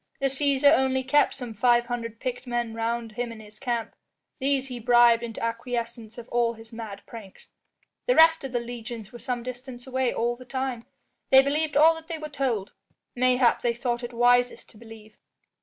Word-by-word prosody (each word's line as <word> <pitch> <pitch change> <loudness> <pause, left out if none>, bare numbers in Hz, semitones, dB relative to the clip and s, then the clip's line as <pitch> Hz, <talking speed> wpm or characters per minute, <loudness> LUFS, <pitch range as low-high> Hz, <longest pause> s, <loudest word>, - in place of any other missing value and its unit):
"The 275 - +1
Cæsar 280 +2 +4
only 265 -1 +1
kept 290 +3 +3
some 245 -4 -7
five 240 +2 +3
hundred 230 -2 -5
picked 250 0 -4
men 240 -2 -2
round 230 0 -2
him 240 +2 -4
in 225 - -10
his 215 0 -15
camp. 240 -4 -2 0.5
These 270 0 0
he 250 -2 -6
bribed 240 0 +5
into 230 -1 -6
acquiescence 230 -1 -4
of 240 -1 -9
all 235 -1 +1
his 225 0 -14
mad 220 -3 -8
pranks. 215 -5 -12 0.6
The - - +3
rest 325 -1 +6
of 270 - -5
the 245 - 0
legions 235 -2 -7
were 240 - -9
some 245 -1 -3
distance 250 0 -8
away 260 -1 0
all 240 +1 -1
the 255 - -12
time. 255 -2 -4 0.4
They 265 0 +8
believed 295 +1 0
all 320 +2 +7
that 325 0 -10
they 330 -1 -4
were 305 -1 -7
told; 250 -9 -2 0.4
mayhap 250 -1 +3
they 235 -1 0
thought 240 0 -2
it 240 - -5
wisest 245 +1 +2
to 220 - -18
believe." 220 -1 -14
240 Hz, 190 wpm, -26 LUFS, 230-265 Hz, 0.6 s, They